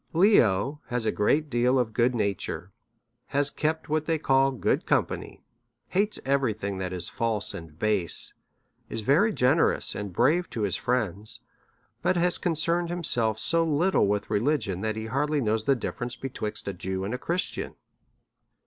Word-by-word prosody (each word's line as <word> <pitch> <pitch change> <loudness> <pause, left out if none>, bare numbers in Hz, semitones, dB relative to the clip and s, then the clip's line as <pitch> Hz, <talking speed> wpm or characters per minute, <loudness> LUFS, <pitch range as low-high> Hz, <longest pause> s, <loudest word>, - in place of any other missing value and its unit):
Leo 145 - +3
has 125 -2 -2
a - - +2
great 150 +9 +1
deal 125 0 +2
of 120 -4 0
good 120 +2 +2
nature, 100 -4 -2 0.6
has 145 +1 +3
kept 160 +1 -2
what 155 0 -1
they 165 -1 +2
call 135 -2 +3
good 130 -3 -1
company, - - -1 0.5
hates 205 +3 0
every 135 -4 +2
thing 100 -2 -4
that 90 -1 -3
is 90 -2 -3
false 115 -3 -1
and 80 -2 -9
base, 100 -3 +2 0.6
is 115 - -3
very 160 - +3
generous 140 -2 +2
and 100 -1 -5
brave 150 - +2
to 110 - -3
his 100 - +1
friend; 110 -4 -1 0.6
but 185 - +1
has 175 +1 +1
concerned 170 +1 0
himself 120 -11 0
so 165 +8 +2
little 165 - +2
with 105 0 -1
religion, 105 -4 0
that 110 +1 -1
he 110 0 -4
hardly 145 +6 0
knows 110 -3 0
the 140 - +4
difference 120 0 -4
betwixt 120 -6 -5
a 100 - -2
Jew 95 +1 -4
and 100 +4 -3
a 125 - -3
Christian. 175 +5 -3
125 Hz, 165 wpm, -27 LUFS, 105-155 Hz, 0.6 s, the